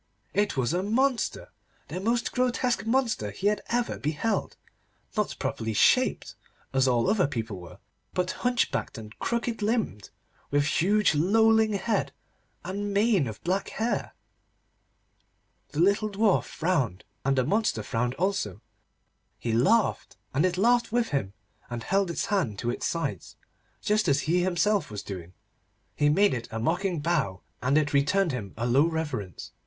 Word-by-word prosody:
It 205 -6 +1
was 130 +3 +1
a 180 - +1
monster, 240 +5 0 0.4
the 180 - -5
most 230 +4 0
grotesque 245 -4 0
monster 230 - +1
he 100 - -7
had 210 +1 +2
ever 240 0 -1
beheld. 160 +9 -1 0.6
Not - - 0
properly 110 0 -2
shaped, - - +3 0.4
as 135 0 +3
all 120 -2 +2
other 200 -5 +3
people 110 -7 -4
were, 85 - -12 0.4
but 180 0 -1
hunchbacked, 245 - 0
and 105 -1 -9
crooked 235 -1 -2
limbed, 210 - -1 0.4
with 145 0 +2
huge 200 +6 +3
lolling 220 +7 +4
head 205 +1 -1 0.5
and 200 +2 -3
mane 200 - +3
of 110 -2 -8
black 190 +3 -1
hair. 225 +2 -2 1.5
The 145 - -5
little 200 +4 +3
Dwarf 205 0 +2
frowned, 145 - -1 0.2
and 135 0 +1
the 130 - +4
monster 215 - +1
frowned 120 +1 -1
also. 180 - -1 0.8
He 115 - -2
laughed, 195 - +2 0.2
and 150 +7 +3
it 180 -1 -3
laughed 240 +4 +3
with 240 0 +1
him, 105 -9 -2 0.4
and 120 -1 -5
held 195 -1 +1
its 170 - -2
hands 150 - 0
to 120 - 0
its - - -2
sides, 165 -1 -3 0.5
just 210 0 +2
as 140 - +3
he 175 +3 +1
himself 185 +1 +1
was 105 -1 -6
doing. 90 -3 -8 0.6
He 145 0 +3
made 200 +5 +4
it 115 -2 -4
a 115 - -5
mocking 175 - 0
bow, 150 - 0 0.2
and 135 +4 +2
it 150 -1 +1
returned 165 +6 +3
him 110 -7 -5
a 115 - -1
low 135 +6 +4
reverence. 145 - -4
175 Hz, 155 wpm, -27 LUFS, 130-210 Hz, 1.5 s, lolling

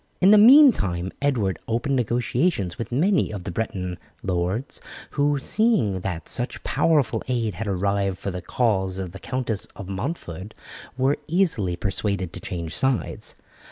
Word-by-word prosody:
In 190 +2 +6
the 210 - +8
meantime 210 - +6
Edward 115 -10 0
opened 120 +5 0
negotiations 120 - 0
with 115 - -5
many 180 - +2
of 100 -4 -6
the 90 - -4
Breton 90 -3 -3 0.2
lords, 95 +8 -2 0.3
who, 145 0 +1
seeing 185 - +2
that 90 -4 -4
such 120 - -2
powerful 145 -4 +2
aid 115 -4 -1
had 105 +5 -5
arrived 100 0 0
for 100 - -4
the 90 0 -5
cause 95 -6 0
of 95 -2 -4
the 95 - -10
Countess 120 -3 -3
of 100 - -8
Montford, 100 - -5 0.4
were 135 +2 +2
easily 155 - +1
persuaded 95 -1 -2
to - - -6
change 85 -3 -5
sides. 130 -3 -1
110 Hz, 150 wpm, -24 LUFS, 95-140 Hz, 0.4 s, the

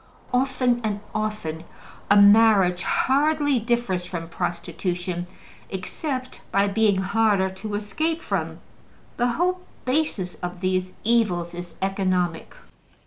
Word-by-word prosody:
Often 250 -1 +2
and 210 -2 -1
often, 215 -7 -3 0.5
a 205 0 +7
marriage 200 -3 +6
hardly 290 - +2
differs 230 -6 0
from 170 -2 -6
prostitution 175 +1 -3 0.4
except 255 - -4
by 200 +1 +3
being 205 -1 +2
harder 195 0 +2
to 205 +2 -5
escape 310 +11 -1
from. - - -3 0.6
The 245 - +2
whole 365 +5 +1 0.3
basis 255 - 0
of 180 0 -5
these 185 0 0
evils 205 -7 +1
is 175 0 -8
economic. 185 -3 -1
200 Hz, 110 wpm, -24 LUFS, 180-240 Hz, 0.6 s, a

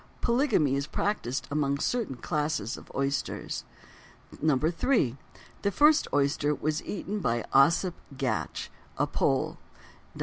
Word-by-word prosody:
Polygamy 235 - +2
is 140 +1 -1
practised 140 - -2
among 140 -1 +1
certain 220 - -1
classes 145 -3 -1
of - - -12
oysters. 135 0 -2 0.7
3. 155 - +1 0.4
The 200 - +1
first 300 - +5
oyster 145 +1 +2
was 155 +2 -1
eaten 205 +1 -3
by 120 - 0
Ossip 165 +6 +5 0.2
Gatch, 130 -2 -2 0.3
a - - +2
Pole - - 0 0.6
(d. - - -11
150 Hz, 115 wpm, -28 LUFS, 135-200 Hz, 0.7 s, first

